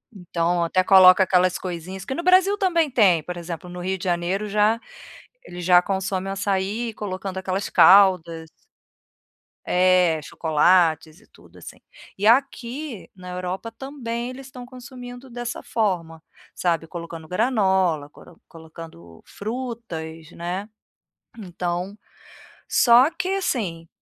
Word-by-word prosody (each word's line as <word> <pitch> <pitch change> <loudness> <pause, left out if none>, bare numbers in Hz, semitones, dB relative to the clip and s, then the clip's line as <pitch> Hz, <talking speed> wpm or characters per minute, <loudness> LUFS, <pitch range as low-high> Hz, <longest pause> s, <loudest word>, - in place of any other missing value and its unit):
Então, 175 -1 -1
até 185 +2 +1
coloca 185 0 +7
aquelas 185 -1 +2
coisinhas 180 +1 -7
que 265 - -5
no 340 - -4
Brasil 375 +3 +4
também 340 -6 +1
tem, 195 - +3
por 180 0 -7
exemplo, 170 0 -7
no 180 0 -8
Rio 190 +2 -2
de 185 - -8
Janeiro 180 +4 -1
já 210 +2 +2 0.7
eles 175 0 -8
já 180 0 +6
consomem 190 0 -3
açaí 200 +4 -2
colocando 190 -1 -5
aquelas 190 +1 -3
caldas. 175 -4 +5 1.2
É, 180 -3 +3
chocolates 160 +1 +1
e - - -24
tudo, - - -20
assim. - - -12 0.4
E 200 - -3
aqui 255 +1 0
na 180 -1 -11
Europa, 180 +5 -5
também, 240 -1 -6
eles 260 +1 -10
estão 250 -2 -10
consumindo 250 0 -11
dessa 240 0 -6
forma. 170 -7 -2 0.3
Sabe, 165 -2 -1
colocando 165 -1 -8
granola, 190 - +1
coro 165 +3 -18
colocando 160 - -13
frutas, 200 -9 -7
né. 180 +4 -5 0.7
Então, 180 0 -4 0.7
só 245 +3 +5
que 365 - -4
assim, 220 - -2
190 Hz, 125 wpm, -23 LUFS, 175-235 Hz, 1.2 s, coloca